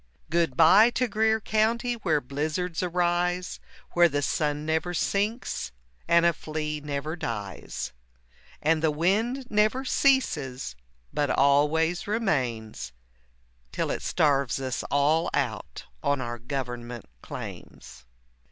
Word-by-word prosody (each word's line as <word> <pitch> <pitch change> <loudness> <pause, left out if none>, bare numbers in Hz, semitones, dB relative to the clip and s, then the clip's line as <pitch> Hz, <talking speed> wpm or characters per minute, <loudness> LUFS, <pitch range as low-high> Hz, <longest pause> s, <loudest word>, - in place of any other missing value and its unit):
Good 165 -6 +1
bye 190 +8 +7
to 250 - +2
Greer 220 +1 +2
County 225 +3 +1
where 165 -10 +1
blizzards 155 +6 -2
arise, 180 0 0 0.3
Where 175 0 +5
the 145 -1 -1
sun 150 0 -1
never 160 +3 -1
sinks 205 - -1 0.4
and 170 0 +5
a 170 - +4
flea 155 -1 -4
never 145 +2 -3
dies, 105 - -5 0.7
And 155 +1 +3
the 160 - +3
wind 210 - 0
never 215 +5 +2
ceases 150 - +1 0.4
but 145 -1 0
always 150 +6 +2
remains 115 - -1 0.8
Till - - -1
it - - -3
starves 140 -4 +1
us 130 -2 -2
all 150 +4 +2
out 110 - -3 0.2
on 140 -1 +1
our 120 -1 -4
government 120 -2 -5 0.2
claims. - - -9
155 Hz, 115 wpm, -27 LUFS, 135-180 Hz, 0.8 s, bye